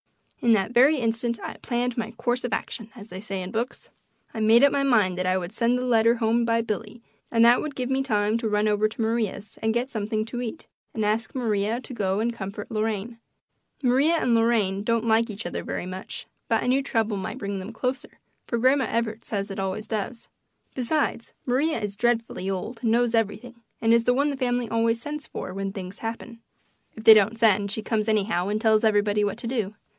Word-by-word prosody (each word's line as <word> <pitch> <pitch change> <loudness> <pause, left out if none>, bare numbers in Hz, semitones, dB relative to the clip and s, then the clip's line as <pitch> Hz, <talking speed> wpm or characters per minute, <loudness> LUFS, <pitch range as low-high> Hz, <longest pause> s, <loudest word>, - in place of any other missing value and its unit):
In 235 -1 +4
that 205 0 +1
very 265 +6 +5
instant 230 -1 -1
I - - -6
"planned 245 0 -2
my 225 -2 -2
course 240 +1 -1
of 245 - -3
action," 225 -1 -4
as 220 -2 -11
they 185 +1 -7
say 195 -3 -4
in 180 - -7
books. 235 +3 -4 0.4
I 225 - -5
made 225 +3 +5
up 280 - +6
my 280 - +1
mind 220 -9 +3
that 185 - 0
I 185 0 +2
would 175 0 -4
send 235 +2 +2
the 250 - -2
letter 230 -1 +4
home 230 +1 +1
by 230 0 +2
Billy, 225 +1 -5 0.3
and 230 0 +4
that 240 +1 +6
would 305 -2 -5
give 255 0 -3
me 265 0 +2
time 215 -3 +1
to 225 -2 -1
run 210 0 +2
over 210 0 +2
to 215 - -6
Maria's 220 -2 -2
and 220 +1 0
get 250 +3 -1
something 215 0 -2
to 240 +2 -5
eat 230 -3 -6 0.3
and 220 -2 0
ask 220 +5 -1
Maria 220 -2 0
to 255 - -9
go 195 -3 0
and 235 +2 0
comfort 200 0 -7
Lorraine. 220 +1 -2 0.6
Maria 270 +7 +3
and 250 -7 +1
Lorraine 225 -4 +2
don't 230 +1 0
like 230 +1 +3
each 210 +2 -6
other - - -4
very - - -4
much, 185 +1 -7 0.2
but 225 - +1
I - - -3
knew 260 +2 +3
trouble 225 -6 0
might 190 - -5
bring 200 -1 -4
them 190 +4 -7
closer, 250 +3 -4 0.3
for 235 - -1
Grandma 260 +3 +3
Evarts 230 -1 -2
says 200 -1 -3
it 195 - -5
always 195 +2 -3
does. 225 +2 -4 0.5
Besides, 260 -2 -1
Maria 275 +4 +1
is 205 -2 -4
dreadfully 230 -4 0
old 205 +5 -4
and 230 - +1
knows 240 0 +2
everything 225 +2 -2 0.2
and 225 0 +3
is 230 0 +3
the 245 - +3
one 285 +2 +2
the 280 - -5
family 245 -2 0
always 230 +1 +1
sends 295 +4 -6
for 185 - -6
when 195 0 -3
things 190 -1 -8
happen. 230 +1 -6 0.6
If 220 - -9
they 220 - +11
don't 215 +1 +3
send 205 -3 +3
she 215 +2 -3
comes 215 -1 -1
anyhow 200 -4 +1
and 210 +1 0
tells 220 -1 +3
everybody 210 -1 +3
what 205 +1 -1
to 240 - -9
do. 220 -5 -2
225 Hz, 220 wpm, -25 LUFS, 210-240 Hz, 0.6 s, they